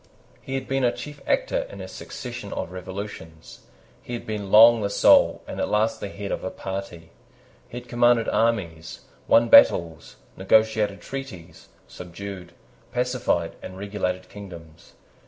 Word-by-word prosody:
He 135 - -5
had 135 - -4
been 135 0 -1
a 120 - +3
chief 145 +2 -9
actor - - 0
in - - -10
a - - -7
succession 120 -5 -8
of 85 - -5
revolutions. 95 -3 -9 0.4
He 120 - -9
had 120 - -5
been 105 -2 -5
long 115 +1 +8
the 100 - -1
soul, 100 - +4
and - - -7
at - - -1
last 110 +1 +1
the 100 - -5
head, 100 0 -7
of - - -3
a 95 - -2
party. 95 -5 -7 0.6
He 120 - -8
had 125 - -17
commanded 120 -1 +3
armies, 90 -8 -1 0.3
won 115 +1 +5
battles, 85 -7 +5 0.2
negotiated 105 0 +2
treaties, 135 -11 -9 0.2
subdued, 90 0 -9 0.4
pacified, 125 -9 -1
and 95 - -9
regulated 95 -2 -3
kingdoms. 85 -5 -12
100 Hz, 150 wpm, -24 LUFS, 90-120 Hz, 0.6 s, long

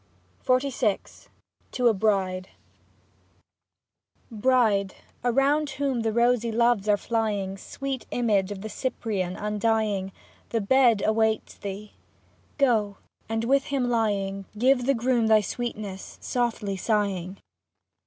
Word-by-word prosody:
50 255 +2 +2
XLVI 215 -6 -2 0.4
TO 250 -2 +2
A 230 - +5
BRIDE 190 -3 0 1.8
Bride, 215 -4 +2 0.3
around 275 +5 +2
whom 270 -2 -1
the 225 -1 0
rosy 235 0 +2
loves 235 -2 +2
are 205 - +5
flying. 205 -4 -1
Sweet 265 +4 -6
image 205 -5 +1
of 195 -1 -6
the 215 - -5
Cyprian 205 -5 -3
un 210 0 -3
dying, 215 -4 0 0.4
The 230 - 0
bed 235 -1 +4
awaits 220 0 +1
thee; 200 +1 -7 0.6
go, 220 -8 +2 0.3
and 225 0 -1
with 275 +3 +2
him 260 -3 -1
lying, 200 -4 0
Give 260 +4 +4
to 245 - -4
the 275 +1 +3
groom 240 -1 +1
thy 220 -1 +5
sweetness, 210 -3 -5
softly 230 -5 -2
sighing. 195 -3 -1
220 Hz, 125 wpm, -26 LUFS, 200-245 Hz, 1.8 s, A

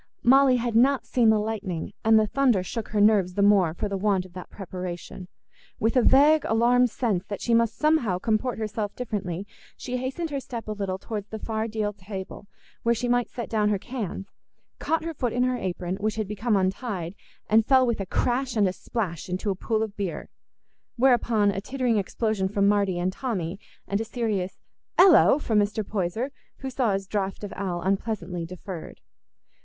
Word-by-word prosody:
Molly 265 +1 +6
had 240 -2 -1
not 265 +3 +4
seen 235 -3 +3
the 220 - +5
lightning, 210 -6 -3
and 220 0 +6
the 215 - +4
thunder 240 -4 +2
shook 225 +4 -5
her 210 - -1
nerves 205 -4 +4
the 200 - +2
more 195 -5 +4
for 210 - -2
the 200 -1 -3
want 195 -2 +1
of 185 - -15
that 180 -1 -9
preparation. 180 -1 -7 0.5
With 225 +3 +1
a 250 - +5
vague 290 +5 +5
alarmed 240 +2 +3
sense 215 -6 -1
that 205 - -5
she 235 - 0
must 230 -1 +2
somehow 300 - +2
comport 220 +5 0
herself 215 -1 -3
differently, 200 -6 -4 0.3
she 250 -1 -4
hastened 265 +6 -3
her 280 - -1
step 235 -4 -7
a - - -3
little 200 -3 -3
towards 210 0 -5
the 220 - -6
far 220 0 -3
deal 210 -2 -2
table, 195 0 -8 0.3
where 235 0 +2
she 245 +2 -2
might 245 0 +1
set 235 - -5
down 210 -2 +1
her 205 - +1
cans—caught 240 - -5
her 330 0 -4
foot 245 -6 -2
in 245 - +1
her 255 0 +1
apron, 180 -3 -3
which 215 +1 -1
had 215 -2 -2
become 210 +2 0
untied, 190 -2 -1 0.3
and 220 +1 +4
fell 260 -1 +5
with 235 -3 -1
a 195 - -4
crash 250 +5 0
and 205 -2 +4
a 185 - -1
splash 185 -7 -4
into 185 +3 -1
a - - -2
pool 220 +3 -1
of 215 -2 -5
beer; 195 -4 -4 0.7
whereupon 235 -5 +3
a 195 - -4
tittering 250 -1 0
explosion 205 0 -1
from 200 0 +2
Marty 200 -3 +2
and 180 +1 -1
Tommy, 195 -8 -3 0.3
and 200 +2 -1
a - - 0
serious 220 -5 -2 0.4
"Ello!" 355 -6 +7
from 225 -8 +1
Mr. 205 0 -1
Poyser, 215 +7 -2 0.3
who 265 -1 -6
saw 245 -5 +1
his 195 0 -2
draught 195 0 -3
of 205 - -5
ale 180 -3 -3
unpleasantly 190 -3 -2
deferred. 180 -1 -8
215 Hz, 190 wpm, -26 LUFS, 195-240 Hz, 0.7 s, Ello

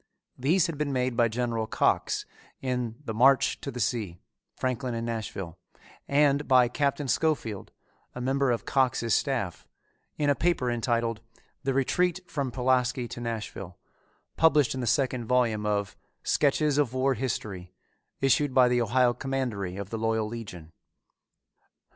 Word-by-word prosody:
These 160 +8 +2
had 165 -5 -4
been 150 -2 -1
made 125 -2 0
by 120 -1 +4
General 115 -1 -2
Cox - - +1 0.3
in 125 -3 -2
The 110 - -3
March 130 +4 +4
to - - -5
the 125 -2 -6
Sea 105 -5 -1 0.4
Franklin 125 -1 -2
and 115 0 -3
Nashville, 105 -7 -5 0.5
and 145 0 +3
by 125 -2 +6
Captain 140 +2 -1
Scofield, 130 -9 -1 0.4
a - - -5
member 135 +2 +1
of 120 -1 -1
Cox's 125 -4 +1
staff, 120 - -1 0.5
in 145 - 0
a 145 - +5
paper 140 -4 +1
entitled 115 -1 -1 0.4
"The 135 -1 0
Retreat 180 +7 +1
from 140 -4 -2
Pulaski 125 0 +1
to 120 - -7
Nashville," 105 -6 -5 0.6
published 150 -5 +4
in 130 - -4
the 120 - -3
second 130 -1 +1
volume 115 -4 +1
of 100 -1 -1 0.3
Sketches 150 0 +2
of 130 -4 0
War 135 +1 +2
History, 105 -7 -4 0.5
issued 135 +1 +2
by 130 -1 +6
the 125 0 +2
Ohio 120 +2 +3
Commandery 120 -8 -3
of 100 -1 -6
the 115 - -3
Loyal 110 -1 0
Legion. 100 -8 -8
125 Hz, 150 wpm, -27 LUFS, 115-135 Hz, 0.6 s, by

